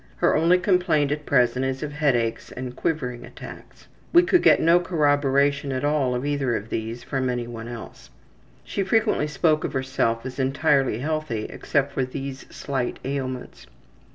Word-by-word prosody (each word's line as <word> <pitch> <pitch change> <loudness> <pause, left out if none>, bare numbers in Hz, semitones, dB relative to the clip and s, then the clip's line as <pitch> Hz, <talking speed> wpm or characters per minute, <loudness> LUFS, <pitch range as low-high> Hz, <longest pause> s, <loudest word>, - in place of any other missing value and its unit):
Her - - +2
only 170 +3 +4
complaint 180 -6 +2
at 150 0 -3
present 125 -1 +2
is 135 +2 -2
of 145 -1 -5
headaches 120 -7 0
and 130 -1 -6
``quivering'' 125 -7 -2
attacks. 120 - -12 0.3
(We 345 +1 +7
could 360 0 +3
get - - +6
no 170 +2 +5
corroboration 145 -4 +1
at 130 0 -2
all 145 -4 +1
of 125 +3 -3
either 140 -4 0
of 105 +3 -5
these 115 +2 -4
from 130 -2 -2
any 120 -1 -2
one 115 -1 -7
else.) 115 - -9 0.5
She - - -3
frequently 205 -5 +1
spoke 155 +1 +1
of - - -3
herself 130 -3 -1
as 130 +1 -6
entirely 135 -2 +2
healthy 145 -5 -2
except 140 0 -1
for 135 - 0
these 135 +1 -6
slight 130 -3 -3
ailments. 130 - -5
135 Hz, 165 wpm, -24 LUFS, 125-150 Hz, 0.5 s, We